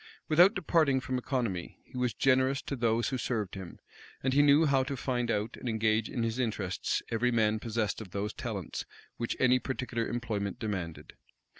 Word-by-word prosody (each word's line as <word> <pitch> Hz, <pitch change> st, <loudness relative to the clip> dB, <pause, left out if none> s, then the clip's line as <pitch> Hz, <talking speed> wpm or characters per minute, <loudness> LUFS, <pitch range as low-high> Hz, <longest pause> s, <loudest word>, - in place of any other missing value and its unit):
Without 175 Hz, +6 st, +6 dB
departing 160 Hz, -6 st, +3 dB
from 130 Hz, 0 st, -2 dB
economy, 120 Hz, -10 st, -2 dB
he -, -, -18 dB
was 125 Hz, -3 st, 0 dB
generous 130 Hz, +1 st, +3 dB
to 140 Hz, -, -3 dB
those 115 Hz, -2 st, +1 dB
who 130 Hz, -1 st, -2 dB
served 110 Hz, -6 st, -2 dB
him; 95 Hz, -3 st, -8 dB, 0.5 s
and 130 Hz, 0 st, +1 dB
he 145 Hz, -, +6 dB
knew 145 Hz, +2 st, +6 dB
how 140 Hz, -2 st, +3 dB
to 135 Hz, +1 st, -3 dB
find 125 Hz, -2 st, -1 dB
out 105 Hz, +1 st, -1 dB
and 125 Hz, -, -4 dB
engage 110 Hz, 0 st, +1 dB
in 120 Hz, -, -2 dB
his 115 Hz, +2 st, -1 dB
interests 105 Hz, -6 st, -1 dB
every 120 Hz, +2 st, +2 dB
man 110 Hz, -2 st, +2 dB
possessed 110 Hz, -1 st, -2 dB
of 105 Hz, -, -8 dB
those 100 Hz, +3 st, -3 dB
talents 105 Hz, -, -4 dB, 0.3 s
which 115 Hz, -, -2 dB
any 130 Hz, 0 st, +5 dB
particular 125 Hz, -3 st, -3 dB
employment 110 Hz, -4 st, -2 dB
demanded. 95 Hz, -7 st, -4 dB
120 Hz, 180 wpm, -30 LUFS, 110-130 Hz, 0.5 s, Without